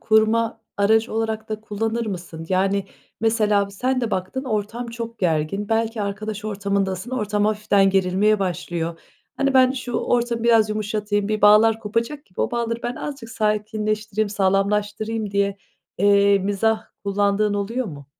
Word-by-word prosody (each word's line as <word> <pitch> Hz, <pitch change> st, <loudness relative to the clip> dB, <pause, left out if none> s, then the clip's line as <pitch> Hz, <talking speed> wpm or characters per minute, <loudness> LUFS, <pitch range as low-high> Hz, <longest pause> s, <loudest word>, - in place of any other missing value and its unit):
kurma 225 Hz, +1 st, +2 dB, 0.2 s
aracı 220 Hz, +3 st, +3 dB
olarak 220 Hz, -1 st, -2 dB
da 215 Hz, 0 st, -4 dB
kullanır 225 Hz, +2 st, -2 dB
mısın? 170 Hz, -4 st, -6 dB
Yani, 195 Hz, +1 st, +1 dB, 0.4 s
mesela 215 Hz, -3 st, +2 dB
bir 200 Hz, -, -13 dB
sen 255 Hz, +5 st, 0 dB
de 235 Hz, -3 st, -2 dB
baktın, 190 Hz, +9 st, -3 dB
ortam 225 Hz, +1 st, -2 dB
çok 230 Hz, 0 st, -7 dB
gergin, 175 Hz, +4 st, 0 dB
belki 225 Hz, -1 st, 0 dB
arkadaş 210 Hz, +1 st, -4 dB
ortamındasın, 200 Hz, 0 st, -2 dB
ortam 210 Hz, -4 st, 0 dB
hafiften 205 Hz, -2 st, +3 dB
gerilmeye 195 Hz, +3 st, +2 dB
başlıyor. 170 Hz, -3 st, -3 dB, 0.4 s
Hani, 275 Hz, -1 st, +1 dB
"Ben 255 Hz, 0 st, +6 dB
şu 255 Hz, -2 st, -5 dB
ortamı 235 Hz, -1 st, 0 dB
biraz 225 Hz, -2 st, +4 dB
yumuşatayım, 210 Hz, -1 st, -1 dB
bir 215 Hz, 0 st, -1 dB
bağlar 220 Hz, +2 st, +6 dB
kopacak 230 Hz, +7 st, -2 dB
gibi 180 Hz, -, -8 dB
o -, -, 0 dB
bağları 235 Hz, -1 st, -2 dB
ben 240 Hz, 0 st, -2 dB
azıcık 270 Hz, -6 st, -6 dB
sakinleştireyim, 215 Hz, -1 st, -1 dB
sağlamlaştırayım." 205 Hz, +2 st, 0 dB
diye, 200 Hz, 0 st, 0 dB, 0.4 s
eee, 200 Hz, 0 st, +5 dB
mizah 215 Hz, +3 st, 0 dB, 0.2 s
kullandığın 205 Hz, +1 st, +1 dB
oluyor 225 Hz, +5 st, -2 dB
mu? 145 Hz, -5 st, -9 dB
215 Hz, 145 wpm, -22 LUFS, 200-225 Hz, 0.4 s, Ben